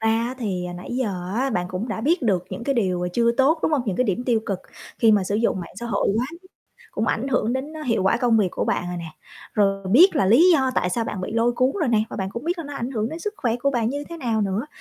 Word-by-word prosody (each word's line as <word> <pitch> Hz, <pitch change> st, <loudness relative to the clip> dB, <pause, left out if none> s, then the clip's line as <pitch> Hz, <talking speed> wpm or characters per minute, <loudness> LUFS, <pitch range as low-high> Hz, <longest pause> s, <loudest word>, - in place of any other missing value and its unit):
Thật 225 Hz, -, +1 dB
ra -, -, +4 dB, 0.2 s
á, 255 Hz, -, -5 dB
thì 190 Hz, -7 st, -2 dB
nãy 180 Hz, -, -9 dB
giờ 190 Hz, -7 st, -2 dB
á, 265 Hz, +4 st, 0 dB
bạn 180 Hz, -6 st, -1 dB
cũng 185 Hz, +6 st, -4 dB
đã 220 Hz, -, -3 dB
biết 315 Hz, +8 st, +1 dB
được 190 Hz, -7 st, +1 dB
những 235 Hz, -, -6 dB
cái 275 Hz, -, +1 dB
điều 180 Hz, -6 st, 0 dB
chưa 235 Hz, +3 st, +3 dB
tốt, 275 Hz, +6 st, +3 dB
đúng -, -, +1 dB
không? 285 Hz, -4 st, +2 dB
Những 190 Hz, -, -1 dB
cái 255 Hz, -, +2 dB
điểm 240 Hz, +3 st, -1 dB
tiêu 235 Hz, -3 st, +2 dB
cực 195 Hz, -3 st, -2 dB, 0.4 s
khi 225 Hz, -2 st, +5 dB
mà 200 Hz, -3 st, +3 dB
sử 200 Hz, -, -2 dB
dụng 215 Hz, -3 st, +1 dB
mạng 170 Hz, -, -9 dB
xã 235 Hz, -, -4 dB
hội 235 Hz, -, 0 dB
quá 240 Hz, +3 st, 0 dB
mức 335 Hz, -, -10 dB, 0.5 s
cũng 220 Hz, -, -2 dB
ảnh 245 Hz, +5 st, 0 dB
hưởng 245 Hz, -3 st, +1 dB
đến 265 Hz, +4 st, -3 dB
hiệu 230 Hz, -5 st, +1 dB
quả 195 Hz, +4 st, +3 dB
công 240 Hz, -1 st, +2 dB
việc 200 Hz, -3 st, +2 dB
của -, -, -2 dB
bạn -, -, 0 dB
rồi 180 Hz, -, -4 dB
nè. 165 Hz, -1 st, -7 dB, 0.4 s
Rồi 195 Hz, -2 st, +1 dB
biết 330 Hz, -, +6 dB
là 270 Hz, -, +3 dB
lý 235 Hz, -, +6 dB
do 265 Hz, -5 st, +3 dB
tại 180 Hz, -, +1 dB
sao 230 Hz, +5 st, -1 dB
bạn 200 Hz, -, -4 dB
bị 185 Hz, -, -4 dB
lôi 230 Hz, +1 st, +2 dB
cuốn 255 Hz, +2 st, +1 dB
rồi 310 Hz, -, +1 dB
nè, 220 Hz, -3 st, +3 dB
và -, -, -6 dB
bạn 190 Hz, -1 st, -3 dB
cũng 235 Hz, +6 st, -6 dB
biết 350 Hz, +2 st, -1 dB
là 335 Hz, -, -4 dB
nó 290 Hz, 0 st, -7 dB
ảnh 250 Hz, -2 st, -3 dB
hưởng 220 Hz, -4 st, -1 dB
đến 320 Hz, -, -6 dB
sức 420 Hz, +5 st, -4 dB
khỏe 235 Hz, -7 st, 0 dB
của 280 Hz, +3 st, 0 dB
bạn 235 Hz, -4 st, 0 dB
như 285 Hz, +2 st, -4 dB
thế 335 Hz, -, -7 dB
nào 235 Hz, -8 st, -1 dB
nữa. 200 Hz, +5 st, -1 dB
230 Hz, 305 wpm, -23 LUFS, 195-260 Hz, 0.5 s, biết